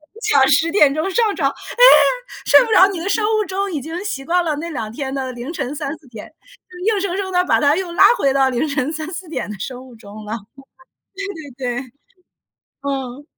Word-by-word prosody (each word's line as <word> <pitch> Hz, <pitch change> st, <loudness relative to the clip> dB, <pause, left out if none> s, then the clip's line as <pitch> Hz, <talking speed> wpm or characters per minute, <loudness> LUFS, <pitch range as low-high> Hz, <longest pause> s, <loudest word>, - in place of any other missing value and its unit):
你 -, -, -12 dB
想 280 Hz, -, +3 dB
10 325 Hz, +5 st, +3 dB
点 300 Hz, -8 st, +4 dB
钟 315 Hz, +5 st, -2 dB
上 430 Hz, +1 st, +1 dB
床， 275 Hz, -6 st, +1 dB
哎， 485 Hz, -, -2 dB, 0.6 s
睡 -, -, +7 dB
不 460 Hz, -, -5 dB
着， 380 Hz, -3 st, +7 dB
你 370 Hz, -, -5 dB
的 360 Hz, +4 st, -3 dB
生 420 Hz, +2 st, +1 dB
物 430 Hz, 0 st, +1 dB
钟 390 Hz, +1 st, -2 dB
已 295 Hz, -, -3 dB
经 330 Hz, +6 st, -6 dB
习 275 Hz, -10 st, -4 dB
惯 350 Hz, +4 st, +1 dB
了 310 Hz, -2 st, 0 dB
那 335 Hz, +3 st, -5 dB
两 225 Hz, -9 st, -5 dB
天 265 Hz, +3 st, -5 dB
的 265 Hz, -2 st, -3 dB
凌 245 Hz, +5 st, -7 dB
晨 275 Hz, -5 st, -4 dB
3-4 290 Hz, +1 st, -6 dB
点， 225 Hz, +4 st, -11 dB, 0.6 s
硬 405 Hz, -, -1 dB
生 380 Hz, -2 st, -2 dB
生 385 Hz, -1 st, -3 dB
地 360 Hz, 0 st, +3 dB
把 -, -, +2 dB
它 290 Hz, 0 st, +3 dB
又 365 Hz, -1 st, -3 dB
拉 -, -, +4 dB, 0.2 s
回 275 Hz, -, +2 dB
到 270 Hz, 0 st, +3 dB
凌 255 Hz, +4 st, -1 dB
晨 285 Hz, 0 st, -2 dB
3-4 335 Hz, +3 st, -6 dB
点 315 Hz, -, -5 dB
的 210 Hz, -, -7 dB
生 255 Hz, +5 st, -6 dB
物 250 Hz, -, -15 dB
钟 215 Hz, -1 st, -12 dB
了， 215 Hz, +2 st, -4 dB, 1.2 s
对 250 Hz, -2 st, -3 dB
对 -, -, -3 dB
对， 255 Hz, -3 st, -8 dB, 0.9 s
嗯。 270 Hz, -1 st, -4 dB
300 Hz, 220 characters per minute, -19 LUFS, 265-365 Hz, 1.2 s, 睡